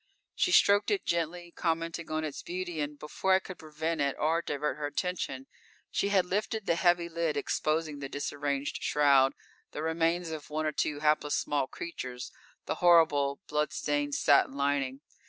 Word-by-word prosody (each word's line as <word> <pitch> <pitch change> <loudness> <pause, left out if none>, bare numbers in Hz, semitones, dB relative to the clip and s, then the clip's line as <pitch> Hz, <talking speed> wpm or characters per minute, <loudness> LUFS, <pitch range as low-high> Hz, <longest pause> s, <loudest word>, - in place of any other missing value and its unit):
She 365 - +1
stroked 205 - +5
it 405 -3 0
gently, 170 +1 -2
commenting 165 0 -2
on 155 0 -1
its 150 -3 -5
beauty, 175 -2 -4
and 145 0 -4
before 150 +6 0
I 190 - +5
could 185 -2 -10
prevent 160 +1 -3
it 140 -1 +1
or 160 +2 +1
divert 150 -2 -2
her 150 -1 -2
attention, 145 -5 -3 0.5
she 200 - 0
had 190 -3 +3
lifted 210 +3 -2
the - - +2
heavy 175 0 +2
lid 165 -3 -1
exposing 155 +1 -1
the 135 -1 -5
disarranged 145 0 -3
shroud, 140 -2 +4 0.4
the 150 - -4
remains 165 +1 0
of 155 -2 -7
one 155 +1 -2
or 155 - +1
two 150 0 -2
hapless 150 -1 +2
small 140 -2 0
creatures, 130 -7 -6 0.3
the - - -3
horrible 155 -5 +4
blood 150 0 0
stained 145 -1 -1
satin 140 -1 +4
lining. 140 -1 -1
155 Hz, 170 wpm, -30 LUFS, 145-170 Hz, 0.5 s, stroked